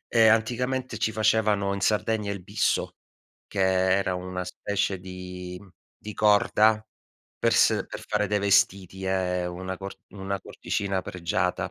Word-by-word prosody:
Ehm, 115 -2 +6
anticamente 125 +2 -1
ci 110 0 0
facevano 105 -2 +2
in 100 - -4
Sardegna 105 0 +1
il 100 -2 -4
bisso, 100 +4 0 0.5
che 100 - -3 0.4
era 95 -2 0
una 90 0 -4
specie 95 +1 -2
di 90 -1 -8
mhmm, 100 - -16 0.3
di 105 0 -8
corda 105 +1 +4 0.6
per - - +2
s - - +4
per - - -7
fare 105 -1 0
dei 105 - +1
vestiti, 100 -2 +2
è 90 -1 0
una 95 +1 -5
cor 95 +1 -7 0.2
una 100 0 -4
cordicina 95 -2 -3
pregiata 90 0 -2
100 Hz, 145 wpm, -26 LUFS, 90-105 Hz, 0.6 s, Ehm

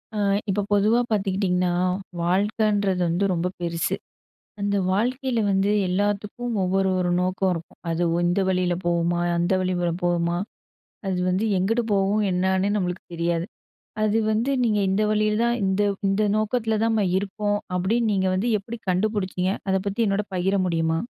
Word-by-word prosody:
அ - - -1 0.3
இப்போ 205 +1 +1
பொதுவா 210 +4 +4
பாத்துக்கிட்டீங்கன்னா, 190 -3 +1 0.5
வாழ்க்கன்றது 200 +1 +1
வந்து 175 +4 +1
ரொம்ப 175 0 0
பெருசு. 170 -1 -1 0.7
அந்த 200 0 0
வாழ்க்கையில 245 +5 0
வந்து 195 +1 +2 0.2
எல்லாத்துக்கும் 205 +5 -1
ஒவ்வொரு 190 +1 +1
ஒரு 180 -1 0
நோக்கம் 185 +1 0
இருக்கும். 165 -1 -9
அது 165 +1 0
ஒ - - +1
இந்த 175 +3 +1
வழியில 180 -1 +1
போவுமா! 175 0 +1 0.2
அந்த 175 +2 +1
வழி 185 0 0
ல 170 - +1
போவுமா! 175 -1 +1 0.7
அது 185 - -1
வந்து 185 +4 +1
எங்குட்டு 225 +6 +1
போகும், 200 +2 +2
என்னான்னே 190 +2 +1
நம்மளுக்கு 180 -2 -2
தெரியாது. 170 0 0 0.6
அது 215 +1 +2
வந்து 225 +5 +1
நீங்க 210 -3 +2
இந்த 195 +3 +1
வழில 215 0 +1
தான் 235 0 +1
இந்த 190 +2 +1 0.3
இந்த 195 +2 +1
நோக்கத்ல 220 +1 0
தான் 225 - +2
நம்ம 215 -3 +2
இருப்போம் 205 +1 -1 0.2
அப்டின்னு 220 +5 +1
நீங்க 190 -1 +1
வந்து 210 +6 0
எப்புடி 230 +4 -8
கண்டுபுடிச்சீங்க? 185 -1 0 0.2
அத 190 - +3
பத்தி 200 +4 -1
என்னோட 200 +1 0
பகிர 185 +2 +1
முடியுமா? 165 -1 0
195 Hz, 155 wpm, -24 LUFS, 180-210 Hz, 0.7 s, பொதுவா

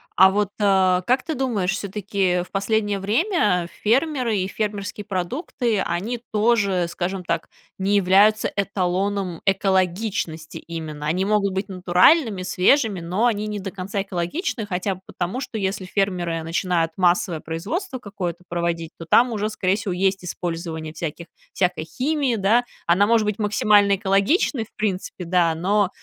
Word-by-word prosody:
А 190 +1 +7
вот, 205 0 0
э, 190 -3 +3
как 255 +1 +2
ты 320 - -3
думаешь, 235 -9 0
всё-таки, 200 0 -5
э, 180 -2 +2
в - - -16
последнее 205 0 0
время 210 - +1 0.2
фермеры 250 -1 +1
и 185 - -1
фермерские 205 0 -4
продукты, 215 - -2
они 190 +7 -2
тоже, 210 -5 +2
скажем 180 +2 -3
так, 170 -1 -2 0.3
не 195 +2 +1
являются 200 +3 +4
эталоном 195 -2 -1
экологичности 190 -3 0
именно. 155 -3 -6
Они 180 +5 0
могут 200 -1 +1
быть 190 +1 -2
натуральными, 190 - +3
свежими, 195 +3 +2
но 180 +7 -1
они 215 -3 +1
не 210 -1 -4
до 195 0 -5
конца 195 +1 -3
экологичны 205 - -3
хотя 190 +1 -1
бы 185 - -17
потому, 185 +9 -3
что 240 -4 -5
если 195 -1 -2
фермеры 180 -4 -1
начинают 165 0 0
массовое 175 -2 +2
производство 195 - -4
какое-то 185 -7 -5
проводить, 170 -1 -2
то 165 - -8
там 245 +1 +5
уже, 215 -1 -1
скорее 195 -2 0
всего, 200 -3 -3
есть 190 0 0
использование 165 -3 -5
всяких 165 +1 -5 0.3
всякой 180 -4 0
химии, 270 - 0
да. 220 +4 +3 0.2
Она 185 +4 +4
может 225 -1 +3
быть 210 +1 -2
максимально 205 -1 +4
экологичной, 200 - +1
в - - -29
принципе, 190 -3 -3
да, 170 -2 +2
но, 195 +4 +1
195 Hz, 150 wpm, -22 LUFS, 180-215 Hz, 0.3 s, А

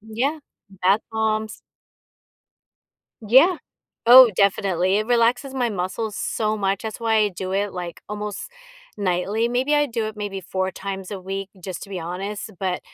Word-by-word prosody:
Yeah, 235 +8 -2 0.3
bath 195 +2 +2
bombs 220 0 -1 1.7
Yeah. 270 - +6 0.5
Oh, 250 0 +10
definitely 190 -1 +2
it 215 - -2
relaxes 245 +3 +2
my 250 -3 0
muscles 205 +2 -3
so 215 -1 -1
much 195 -1 -1
that's 220 -1 -5
why 225 -1 +1
I 215 -1 +4
do 185 0 -5
it 200 0 0
like 175 -2 -6
almost 210 - -5 0.5
nightly. 200 +3 0
Maybe 255 +5 +1
I 295 0 +3
do 230 -4 -2
it 215 0 -6
maybe 205 -2 -4
4 185 +1 -2
times 190 0 -6
a 200 -2 -5
week, 195 +1 -5
just 185 -1 -6
to - - -9
be 185 -2 -4
honest. 195 +6 -5
But 185 -2 -2
210 Hz, 160 wpm, -23 LUFS, 190-225 Hz, 1.7 s, Oh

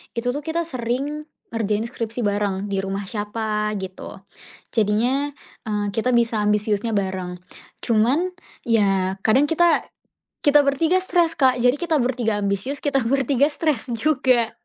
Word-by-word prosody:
itu 240 +1 0
tuh 285 - -3
kita 325 +3 -1
sering 280 +2 -3 0.3
ngerjain 215 -1 0
skripsi 230 0 -4
bareng, 205 -1 -1
di 195 - 0
rumah 195 +1 -3
siapa, 210 0 -2
gitu. 190 0 -8 0.5
Jadinya, 235 +6 +1 0.4
eee, 210 -1 -1
kita 240 +4 +1
bisa 230 -2 +2
ambisiusnya 210 +1 0
bareng. 190 -2 -3 0.4
Cuman 255 +11 +2 0.3
ya 195 -4 +1
kadang 240 +6 +4
kita 340 0 +4 0.6
kita 295 0 +6
bertiga 310 +6 +2
stres, 345 -3 +2
Kak. 260 -2 +5
Jadi 245 +2 +4
kita 335 -3 +1
bertiga 240 -3 0
ambisius, 200 +8 -2
kita 280 -2 +2
bertiga 275 +1 +2
stres 295 -5 -1
juga. 255 -3 +2
230 Hz, 135 wpm, -22 LUFS, 210-280 Hz, 0.6 s, kita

